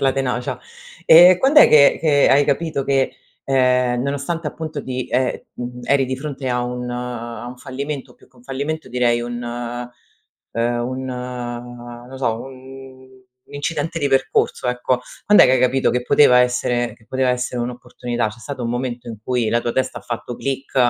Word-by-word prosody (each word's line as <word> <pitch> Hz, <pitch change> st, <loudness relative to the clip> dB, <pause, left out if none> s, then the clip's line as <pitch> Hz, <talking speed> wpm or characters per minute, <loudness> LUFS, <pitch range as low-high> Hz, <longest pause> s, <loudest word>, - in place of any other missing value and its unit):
la 135 Hz, -1 st, +2 dB
tenacia. 125 Hz, -2 st, -2 dB, 0.5 s
Ehm, 175 Hz, +2 st, +8 dB
quand'è 285 Hz, +6 st, +6 dB
che 140 Hz, -2 st, +6 dB
che 145 Hz, -3 st, +4 dB
hai 145 Hz, +1 st, +5 dB
capito 145 Hz, 0 st, -1 dB
che, 135 Hz, -1 st, +1 dB, 0.3 s
ehm, 125 Hz, -2 st, +2 dB
nonostante, 145 Hz, +4 st, -3 dB
appunto, 155 Hz, -1 st, -6 dB
di 130 Hz, -1 st, -4 dB
ehm, 125 Hz, +1 st, 0 dB
mhmm, 125 Hz, 0 st, -7 dB
eri 140 Hz, 0 st, +3 dB
di 130 Hz, 0 st, -3 dB
fronte 135 Hz, -2 st, -5 dB
a 125 Hz, 0 st, 0 dB
un 125 Hz, 0 st, -4 dB
a 120 Hz, -2 st, -5 dB
un 125 Hz, +1 st, -8 dB
fallimento? 135 Hz, 0 st, -6 dB
Più -, -, -23 dB
che 130 Hz, -, -28 dB
un 120 Hz, -, -19 dB
fallimento, 145 Hz, +4 st, -4 dB
direi 120 Hz, -1 st, +1 dB
un 120 Hz, 0 st, -5 dB
ehm, 120 Hz, +1 st, -5 dB, 1.0 s
un 130 Hz, +1 st, -5 dB, 1.0 s
no 130 Hz, -, -9 dB
so, 120 Hz, -4 st, 0 dB
un 130 Hz, 0 st, -12 dB, 0.5 s
incidente 155 Hz, +3 st, -3 dB
di 140 Hz, -, +1 dB
percorso, 135 Hz, -1 st, +1 dB
ecco. 125 Hz, 0 st, 0 dB, 0.2 s
Quand'è 210 Hz, -, +7 dB
che 130 Hz, -, +4 dB
hai 130 Hz, -, +4 dB
capito 130 Hz, +1 st, +2 dB
che 125 Hz, 0 st, -1 dB
poteva 125 Hz, -1 st, +5 dB
essere 125 Hz, -2 st, +1 dB
che 110 Hz, -1 st, -25 dB
poteva 130 Hz, -1 st, +1 dB
essere 125 Hz, 0 st, -2 dB
un'opportunità? 120 Hz, -1 st, -3 dB
C'è 110 Hz, -, -12 dB
stato 140 Hz, -2 st, -6 dB
un 115 Hz, -, -2 dB
momento 120 Hz, 0 st, -4 dB
in 115 Hz, -, -6 dB
cui 120 Hz, -3 st, 0 dB
la 120 Hz, -, +1 dB
tua 120 Hz, -, -2 dB
testa 130 Hz, -, -1 dB
ha -, -, -14 dB
fatto 120 Hz, 0 st, -5 dB
click 135 Hz, 0 st, -4 dB
130 Hz, 175 wpm, -20 LUFS, 125-140 Hz, 1.0 s, Ehm